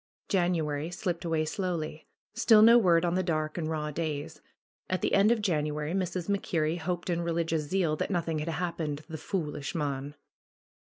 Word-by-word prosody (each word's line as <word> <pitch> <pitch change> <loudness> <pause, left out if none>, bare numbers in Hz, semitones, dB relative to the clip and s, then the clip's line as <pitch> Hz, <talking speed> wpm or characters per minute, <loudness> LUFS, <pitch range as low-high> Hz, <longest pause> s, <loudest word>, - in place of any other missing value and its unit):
January 165 -5 0
slipped 175 -1 -3
away 160 -2 0
slowly. 160 -3 -3 0.3
Still 225 -2 +6
no 235 +2 +8
word 175 -5 +4
on 170 - +1
the 185 - +2
dark 155 -3 -1
and 165 -3 -2
raw 150 -1 -2
days. 150 -2 -4 0.5
At 185 - 0
the - - +1
end 200 +3 +5
of 225 -3 +1
January 150 -3 -1
Mrs. 180 -2 -2
Mac 200 -1 0
Kerrie 160 0 0
hoped 175 +1 -3
in 170 0 0
religious 165 -2 -1
zeal 175 -4 +1
that - - -2
nothing 170 -4 -1
had 150 - -4
hap 170 +1 -3
pened 150 -1 -3
the 160 -1 -7
^Toolish 150 -5 -3
mon." 145 -2 -3
165 Hz, 180 wpm, -29 LUFS, 155-180 Hz, 0.5 s, no